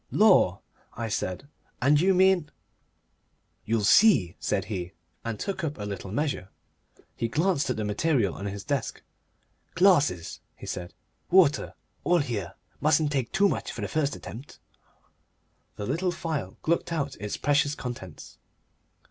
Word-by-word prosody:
"Lor'," 100 - +4 0.3
I 115 -2 -3
said. 95 +4 -3 0.3
"And 145 +4 +4
you 190 +1 +4
mean 185 -4 +4 0.6
" - - -45
"You'll 110 -1 +1
see," 150 - +5
said - - -1
he, 90 -5 -5 0.3
and 115 -2 -4
took 195 -2 -3
up 150 -2 -2
a 105 - -5
little 100 -2 -6
measure. 135 -6 -2 0.7
He 115 - -1
glanced 160 +3 +1
at 125 - 0
the 110 - -2
material 105 - +1
on 100 - -5
his 100 0 -5
desk. 140 -5 -3 0.7
"Glasses," 150 - +3 0.2
he - - -11
said, 90 -1 -6 0.3
"water. 175 -6 +4 0.3
All 175 - +3
here. 105 - -3 0.2
Mustn't 155 0 +3
take 135 -5 -1
too 195 +1 +4
much - - -2
for - - -7
the - - -2
first 150 -3 0
attempt." 125 +6 -10 1.2
The 105 - -5
little 165 - 0
phial 155 - -4
glucked 170 +1 0
out 145 -4 -2
its 105 0 -4
precious 145 +1 +2
contents. 120 - -8
140 Hz, 150 wpm, -27 LUFS, 105-165 Hz, 1.2 s, see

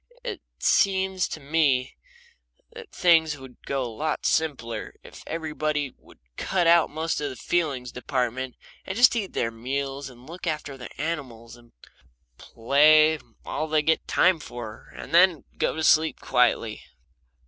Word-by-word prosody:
It 465 -5 -5 0.2
seems 190 -2 +2
to - - -6
me 140 -3 +1 0.8
that - - -11
things 160 -4 +3
would 130 -2 -13
go 135 -1 -1
a - - -3
lot 145 +7 -3
simpler 140 -8 -1
if - - -13
everybody 155 -3 -2
would - - -21 0.2
cut 185 -2 0
out 170 0 +5
most 160 +1 -2
of 145 - -2
the 130 - -7
feelings 135 -4 -1
department, 125 0 -3 0.3
and 190 - -5
just 245 +1 +6
eat 205 -5 -3
their 115 - -1
meals 135 +4 -4
and 125 0 -16
look 175 +2 -8
after 150 -3 -3
their 125 -2 -9
animals 130 -7 -5
and 120 -1 -20 0.7
play 155 +6 +4 0.3
all 155 - -3
they 155 -1 +1
get 160 +1 +1
time 185 -2 +3
for, 120 -5 -9
and - - -9
then 175 -2 +5 0.2
go - - 0
to 160 - -3
sleep 155 +1 +4
quietly. 115 -3 +1
150 Hz, 150 wpm, -25 LUFS, 125-165 Hz, 0.8 s, just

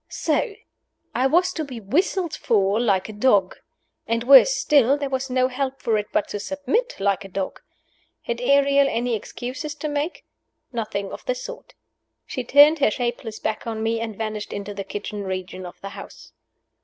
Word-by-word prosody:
So! 450 -5 -1 0.6
I 255 +2 +2
was 360 +5 +3
to 315 - -3
be 260 -5 -7
whistled 335 - 0
for 205 -2 +1
like 200 -6 +1
a 215 - -8
dog! 205 -4 +2 0.5
And, 230 +1 0
worse 275 - +8
still, 280 -2 +4
there 280 -2 -4
was 265 0 -2
no 255 0 +2
help 265 +1 -3
for 230 -3 0
it 210 -1 -1
but - - +1
to 205 - -4
submit 290 - -1
like 200 0 +1
a - - -8
dog. 195 0 -4 0.6
Had 235 0 -3
Ariel 280 +1 +4
any 240 0 -1
excuses 260 +7 -6
to 305 +1 -4
make? 295 +3 -3 0.5
Nothing 210 -4 -3
of - - -8
the - - 0
sort. - - -9 0.5
She 255 - -4
turned 290 +5 +6
her 275 - +4
shapeless 240 -1 -3
back 220 +2 -3
on 220 -1 -3
me 225 0 0
and 225 -3 -5
vanished 215 -1 -4
into 205 0 -5
the 200 0 -5
kitchen 205 +1 -5
region 185 -1 -5
of 175 - -12
the 195 - -6
house. - - -11
240 Hz, 180 wpm, -23 LUFS, 210-280 Hz, 0.6 s, worse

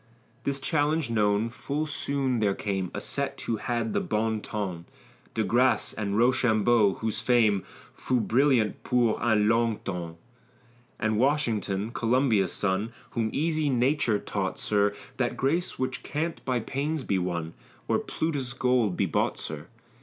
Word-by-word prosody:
This 140 0 -1
challenge 150 -1 0
known, 105 0 +2
full 145 +5 -3
soon 140 -4 0
there 100 -2 +2
came 95 -3 -2
A - - -4
set - - -2
who 115 - -1
had 115 0 -2
the - - +2
bon 110 0 -1
ton, 95 -7 -4 0.5
De 110 - +1
Grasse 120 +5 +2
and 100 -1 -2
Rochambeau, 115 -3 +3
whose 110 -2 -2
fame 110 -6 +3 0.3
Fut 125 -3 -1
brillant 125 -4 +3
pour 120 -3 +2
un 110 -3 +3
long 115 -1 +2
tems. 85 -3 -4 0.8
And 110 -1 +1
Washington, 115 -7 0
Columbia's 120 -4 +2
son, 105 +3 -1 0.2
Whom 115 -2 0
easy 155 0 0
nature 125 -3 +2
taught, - - -3
sir, 105 -1 +1 0.2
That 120 -2 -1
grace 160 +7 0
which 130 0 -2
can't 160 +3 -3
by 125 -2 0
pains 140 +5 -2
be 100 -5 0
won, 85 -2 -3 0.3
Or - - +2
Plutus's 140 -6 -2
gold 125 -7 +1
be - - +2
bought, - - 0
sir. - - -5
115 Hz, 145 wpm, -27 LUFS, 105-130 Hz, 0.8 s, Rochambeau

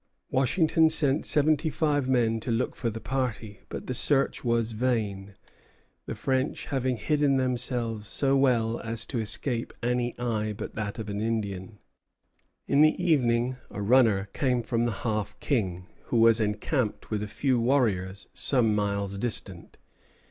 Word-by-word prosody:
Washington 160 +4 +3
sent 150 -2 +1
seventy 155 +1 +2
five 145 -3 0
men 115 -3 +2
to 115 - -6
look 115 +2 0
for 115 - -2
the 115 0 -6
party; 115 -5 -3
but - - -6
the 130 - -3
search 135 +2 +1
was 115 -2 +1
vain, 105 -4 -2 0.7
the - - -4
French 130 0 -1
having 130 -3 -1
hidden 145 0 +1
themselves 120 -4 -1
so 135 +3 +1
well 120 -4 +2
as 115 0 -3
to 125 - -3
escape 115 +2 -1
any 120 0 -1
eye 110 -3 -2
but - - -7
that 105 -2 -4
of 110 -2 -5
an 100 0 -3
Indian. 105 -2 -3 0.9
In 140 - +3
the 155 0 +5
evening 130 -7 +1
a 105 - -5
runner 110 -3 +4
came 125 -3 0
from 115 0 0
the 120 - 0
Half 105 -2 -2
King, 95 -10 -1 0.2
who 120 - -1
was 115 0 +5
encamped 110 +3 -2
with 105 -1 -1
a 105 - -3
few 125 +3 0
warriors 105 -7 0
some 120 -6 +3
miles 100 -1 -1
distant. 100 -6 -3
120 Hz, 155 wpm, -27 LUFS, 105-130 Hz, 0.9 s, the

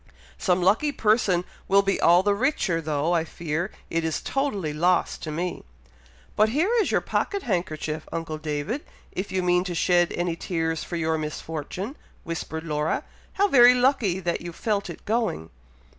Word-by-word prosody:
Some 180 -1 +2
lucky 225 +11 +3
person 210 -7 +2 0.2
will 200 +1 +5
be 195 0 0
all 175 +2 +6
the 205 0 +3
richer, 200 - 0
though 155 +2 0
I 165 -2 +2
fear 165 +2 -3 0.2
it 165 0 0
is 160 -1 -1
totally 205 - -2
lost 175 +4 +1
to 155 - -4
me." 175 +4 -3 0.7
"But 215 +1 +4
here 315 - +1
is - - 0
your - - +2
pocket 400 -1 -1
handkerchief, 155 -6 -2
uncle 165 -2 -4
David, 155 - -3 0.3
if 190 +2 -4
you 185 -1 0
mean 180 0 +3
to 180 -2 -3
shed 175 0 +3
any 175 -1 -1
tears 165 -2 -2
for 175 - -5
your 160 -1 0
misfortune," 160 - -5 0.3
whispered 160 -1 -4
Laura; 150 -1 -1 0.3
"how 400 +1 +3
very 250 -6 +7
lucky 245 -8 +2
that 175 -2 -2
you 175 - -6
felt 205 +3 -2
it - - -9
going!" 215 - -1
175 Hz, 170 wpm, -25 LUFS, 160-210 Hz, 0.7 s, very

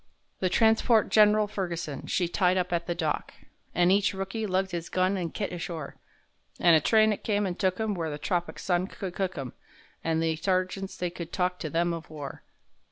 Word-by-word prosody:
The 185 - +1
transport 220 +2 +4
Gen'ral 210 0 +5
Ferguson, 175 -8 -4
she 180 - +1
tied 180 +1 +2
up 180 0 -1
at 170 0 -1
the 175 - -1
dock, 160 -3 -2 0.4
An' 175 +1 +4
each 200 0 +3
rookie 195 +3 -3
lugged 190 0 0
his 170 -1 -4
gun 185 +1 +1
an' 175 -3 -2
kit 200 +2 -4
ashore, 165 -4 -5 0.6
An' 170 -1 +6
a 160 - +6
train 220 +4 +4
it - - -8
come 205 -2 +1
and 180 -1 -3
took 185 -1 +1
'em 220 -1 0
where 165 -4 -2
the 145 - -4
tropic 170 +4 -2
sun 180 0 0
could 190 -3 -6
cook 185 -2 -2
'em,— 135 -3 -5 0.5
An' 160 0 +1
the 160 -1 +1
sergeants 185 +2 -1
they 180 -1 -2
could 170 -1 -7
talk 180 -1 -1
to 155 - -4
them 170 +3 +1
of 165 -2 -7
war. 150 -3 -7
180 Hz, 205 wpm, -28 LUFS, 170-195 Hz, 0.6 s, An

